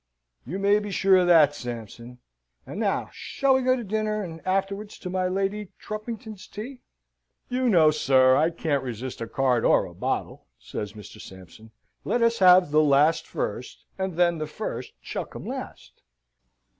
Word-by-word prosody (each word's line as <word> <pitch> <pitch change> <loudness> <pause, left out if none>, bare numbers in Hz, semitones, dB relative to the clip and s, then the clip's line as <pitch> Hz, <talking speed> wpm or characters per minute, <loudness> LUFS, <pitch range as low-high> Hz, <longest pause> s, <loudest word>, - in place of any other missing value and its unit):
"You 175 +8 -4
may 200 +1 +3
be 210 0 -6
sure 195 0 +4
of 180 -1 +3
that, 155 -4 +6
Sampson. 120 -2 -8 0.5
And - - -7
now - - -1
shall 275 -1 0
we 260 - +2
go 255 0 +3
to 245 - -5
dinner, 215 0 -2
and 165 -3 -8
afterwards 195 +2 -2
to 180 - -7
my 185 0 0
Lady 195 +2 -2
Trumpington's 215 -2 -7
tea?" 250 +5 -8 0.7
"You 255 0 0
know, 160 -7 +5
sir, 130 -3 +4
I 155 +4 +3
can't 160 -4 -1
resist 125 0 -6
a 115 - -3
card 125 -2 +1
or - - +4
a - - -11
bottle," - - -4
says 105 -1 -6
Mr. 105 -2 -12
Sampson. 95 +4 -13 0.3
"Let 240 - 0
us 230 0 +2
have 180 -3 +6
the 155 +1 +5
last 150 +2 +3
first - - -5
and 190 -2 -3
then 170 -1 +2
the 155 - -3
first 150 - -6
shall - - -4
come - - -10
last." - - -8
180 Hz, 170 wpm, -25 LUFS, 140-210 Hz, 0.7 s, that